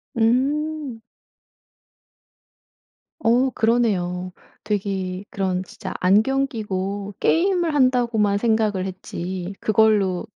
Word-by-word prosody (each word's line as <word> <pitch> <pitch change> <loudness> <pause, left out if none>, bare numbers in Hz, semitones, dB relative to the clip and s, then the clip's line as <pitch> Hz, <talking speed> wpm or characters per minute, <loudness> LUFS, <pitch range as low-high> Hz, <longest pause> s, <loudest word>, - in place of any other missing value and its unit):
음. 270 +2 0 2.2
어 240 +3 +3
그러네요. 195 -7 0 0.3
되게 195 -2 -2
그런 185 -2 -1
진짜 205 -1 -8
안경 220 +9 +3
끼고 200 -4 -4
게임을 350 -2 +2
한다고만 240 -7 +2
생각을 215 -3 +1
했지 185 0 -5
그걸로 210 -3 +2
215 Hz, 180 characters per minute, -22 LUFS, 190-245 Hz, 2.2 s, 어